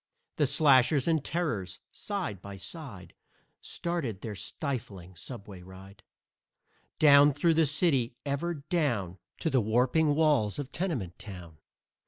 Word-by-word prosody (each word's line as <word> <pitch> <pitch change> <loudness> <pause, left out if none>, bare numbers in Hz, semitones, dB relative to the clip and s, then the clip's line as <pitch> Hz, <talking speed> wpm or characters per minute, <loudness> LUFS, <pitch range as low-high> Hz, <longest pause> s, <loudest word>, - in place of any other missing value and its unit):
The - - +3
Slashers 140 -1 +4
and 160 -3 +2
Terrors, 110 - -3
side 185 - -4
by 100 0 -8
side, 95 - -7 0.5
Started 150 - -3
their 110 - -5
stifling 105 - -5
subway 100 -1 -9
ride 95 +2 -13 1.0
Down 145 -1 +7
through 165 +4 +2
the 160 -1 +3
city, 140 -6 +1
ever 145 +5 -2
down 140 - -1 0.2
To 160 - 0
the 130 - +3
warping 125 +8 +2
walls 145 -10 +2
of 145 -2 -5
Tenement 130 - -3
Town. 90 -6 -10
130 Hz, 125 wpm, -29 LUFS, 100-155 Hz, 1.0 s, Down